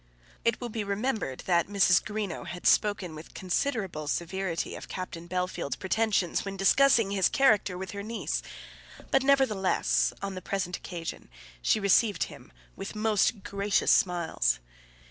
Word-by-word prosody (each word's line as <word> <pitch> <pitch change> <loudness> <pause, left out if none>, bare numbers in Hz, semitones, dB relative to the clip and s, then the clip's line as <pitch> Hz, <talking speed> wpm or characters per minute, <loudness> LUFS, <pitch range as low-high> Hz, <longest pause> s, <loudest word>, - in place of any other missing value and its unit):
It 230 -1 +1
will 245 - -5
be 220 -1 -3
remembered 200 - -2
that 170 -2 +2
Mrs. 195 -2 +4
Greenow 210 -5 -4
had 175 +2 -7
spoken 205 -5 +2
with 155 +1 -11
considerable 190 - -2
severity 175 +2 -2
of - - -8
Captain 175 -2 -6
Bellfield's 180 -5 -2
pretensions 200 -2 0
when 195 -1 -5
discussing 230 +1 +4
his 195 -2 +3
character 210 -8 +3
with 190 0 -6
her 200 - -5
niece; 225 +3 -3 0.7
but, 270 - +4
nevertheless, 265 -8 +2
on 200 -1 -4
the 185 - -6
present 180 -2 -2
occasion 170 -2 -7 0.3
she 215 - +2
received 200 -1 +3
him - - -10 0.2
with - - -7
most 210 -1 +1
gracious 200 0 +1
smiles. 170 - +2
195 Hz, 145 wpm, -28 LUFS, 180-215 Hz, 0.7 s, Mrs